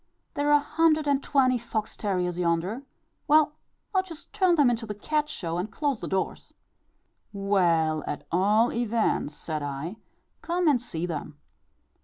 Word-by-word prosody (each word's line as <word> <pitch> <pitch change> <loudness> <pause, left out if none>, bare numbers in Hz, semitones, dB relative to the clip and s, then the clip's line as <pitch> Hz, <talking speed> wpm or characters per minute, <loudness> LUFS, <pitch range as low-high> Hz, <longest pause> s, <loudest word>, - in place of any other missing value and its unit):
There 290 0 -1
are 295 - +6
a - - 0
hundred 315 +1 +2
and 280 -1 +2
twenty 255 -3 +2
fox 220 -2 -3
terriers 180 -4 -1
yonder; 175 +7 0 0.5
well, 300 0 +5 0.4
I'd 375 -1 +1
just 330 +2 -10
turn 375 -4 +3
them 285 -6 +5
into 230 -1 -3
the 210 - -4
cat 300 +8 -1
show 170 -1 -3
and 190 +5 -3
close 285 -2 -1
the - - -5
doors." 190 0 -3 0.8
"Well, 170 -6 +1
at 145 - -4
all 210 +7 +3
events," 230 -10 0
said 155 -2 -4
I, 145 +7 -5 0.4
"come 350 0 0
and 275 -6 +4
see 175 -9 -4
them." 155 -3 -5
220 Hz, 160 wpm, -27 LUFS, 175-290 Hz, 0.8 s, are